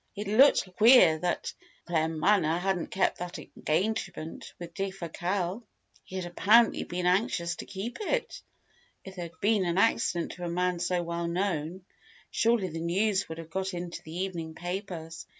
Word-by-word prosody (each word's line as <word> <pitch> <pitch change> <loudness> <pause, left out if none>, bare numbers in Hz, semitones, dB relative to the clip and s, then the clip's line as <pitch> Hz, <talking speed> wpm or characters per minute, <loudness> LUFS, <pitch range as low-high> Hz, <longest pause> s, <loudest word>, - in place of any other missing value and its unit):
It 205 0 -5
looked 215 -4 +4
queer 215 -9 +7
that 175 +1 -2 0.3
Claremanagh 165 +1 +2
hadn't 190 -2 -1
kept 190 - 0
that 180 0 -5
engagement 165 -1 -3
with 170 -1 -9
Defasquelle. 190 +1 -3 0.4
He 190 - -10
had 185 -1 -3
apparently 215 +6 +4
been 175 0 -3
anxious 180 -2 +1
to - - -8
keep 205 +5 -6
it. 485 +3 -2 0.6
If 190 -1 -9
there 175 - -3
had 165 - -13
been 210 -1 +3
an 175 0 -1
accident 195 -5 +2
to 180 - -9
a - - -2
man 180 0 0
so 180 0 0
well 170 0 -3
known, 175 -1 -2 0.5
surely 225 -5 +2
the 165 0 -5
news 190 +3 +1
would 160 - -6
have 165 -1 -9
got 190 +1 -2
into 175 0 -5
the 165 +3 -6
evening 165 -4 -5
papers. 175 -3 -6
180 Hz, 160 wpm, -29 LUFS, 170-195 Hz, 0.6 s, queer